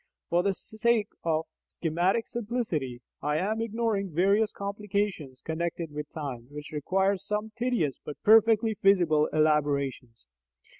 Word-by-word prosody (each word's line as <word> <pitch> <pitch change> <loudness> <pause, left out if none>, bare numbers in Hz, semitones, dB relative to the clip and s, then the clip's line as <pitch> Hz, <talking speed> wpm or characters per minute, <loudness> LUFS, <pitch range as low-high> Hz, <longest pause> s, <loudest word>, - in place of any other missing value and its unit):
(For 175 +1 +4
the 195 +1 0
sake 220 0 +1
of 160 -1 0 0.2
schematic 175 +7 0
simplicity, 205 - -3 0.2
I 150 +1 0
am 215 +6 -1
ignoring 225 -3 -1
various 200 +6 +2
complications 200 -9 -3
connected 165 0 -3
with 150 0 -6
time, 130 -6 -6
which 150 0 -8
require 190 +6 +1
some 210 +3 -3
tedious 235 - 0
but 150 - -7
perfectly 225 0 +5
feasible 175 -7 +3
elaborations.) 140 - 0
185 Hz, 120 wpm, -28 LUFS, 150-210 Hz, 0.2 s, perfectly